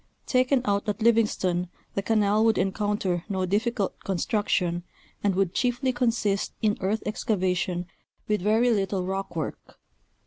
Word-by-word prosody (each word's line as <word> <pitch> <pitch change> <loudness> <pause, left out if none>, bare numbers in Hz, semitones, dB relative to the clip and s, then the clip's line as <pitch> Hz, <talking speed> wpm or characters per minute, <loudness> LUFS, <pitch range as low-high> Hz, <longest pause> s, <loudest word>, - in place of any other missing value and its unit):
Taken 255 0 +2
out 205 +1 0
at 210 +2 -2
Livingston 190 -6 +2 0.2
the 200 - -1
canal 210 0 +2
would 225 -1 +3
encounter 195 -2 0
no 190 -2 0
difficult 210 +2 -1
construction, 185 -2 0 0.4
and 200 -2 +2
would 190 -2 +1
chiefly 255 +1 +1
consist 225 -5 0
in 215 -2 +2
earth 205 +3 0
excavation 185 -4 -1 0.4
with 210 -2 +1
very 220 +5 +3
little 195 -3 0
rock 190 -1 -3
work. 160 -3 -5
205 Hz, 135 wpm, -26 LUFS, 185-225 Hz, 0.4 s, would